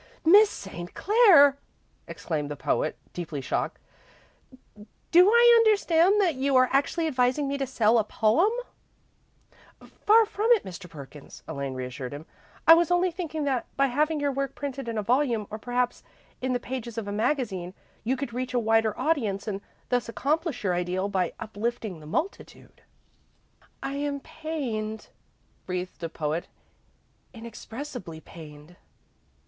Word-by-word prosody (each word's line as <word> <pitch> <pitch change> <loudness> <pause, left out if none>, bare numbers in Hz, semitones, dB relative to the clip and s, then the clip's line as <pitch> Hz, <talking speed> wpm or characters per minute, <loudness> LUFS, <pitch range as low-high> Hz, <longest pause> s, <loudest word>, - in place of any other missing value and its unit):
"Miss 405 +6 +7
St. 175 -3 -8
Clair!" 365 - +6 0.5
exclaimed 150 -4 -4
the 145 - -4
poet, 155 - -1 0.2
deeply 165 -4 -5
shocked; 135 - -2 1.3
"do 360 +3 +7
I 475 +1 +7
understand 400 -3 +4
that 365 -5 +3
you 270 0 0
are 255 0 +5
actually 285 +4 +1
advising 260 0 +1
me 280 - -2
to 270 - -1
sell 230 -2 +3
a - - +2
poem?" 220 - +2 1.6
"Far 445 +2 +7
from 425 +2 -2
it, 455 - +1
Mr. 180 -1 -9
Perkins," 145 -2 -12
Elaine 140 -4 -4
reassured 130 +1 -6
him. 150 +2 -9 0.4
"I 325 - +10
was 335 0 +3
only 355 +1 +2
thinking 325 -3 -4
that 265 -4 -1
by 275 - +4
having 305 +2 +1
your 285 -1 0
work 275 0 -3
printed 275 -3 -5
in 230 -1 -3
a 210 - -1
volume, 240 -1 +1
or 215 - -5
perhaps 245 +2 -1 0.4
in 255 0 -1
the 245 - 0
pages 240 -2 -6
of 220 -3 -4
a - - -3
magazine, 210 -6 -2 0.3
you 255 +4 0
could 255 -3 -5
reach 255 +1 -3
a - - +3
wider 225 -1 +1
audience, 225 -12 0
and 200 -2 -3 0.3
thus 245 -2 0
accomplish 290 - -1
your 185 -3 +1
ideal 180 +2 -1
of 200 -1 -5
uplifting 210 +1 -3
the 150 - -12
multitude." 330 - -5 1.0
"I 275 +1 -3
am 285 0 -2
pained," 230 -10 -5 0.6
breathed 180 0 -4
the 165 - -4
poet; 160 +1 -3 0.9
"inexpressibly 230 - -8
pained." 155 +1 -13
245 Hz, 150 wpm, -26 LUFS, 190-295 Hz, 1.6 s, I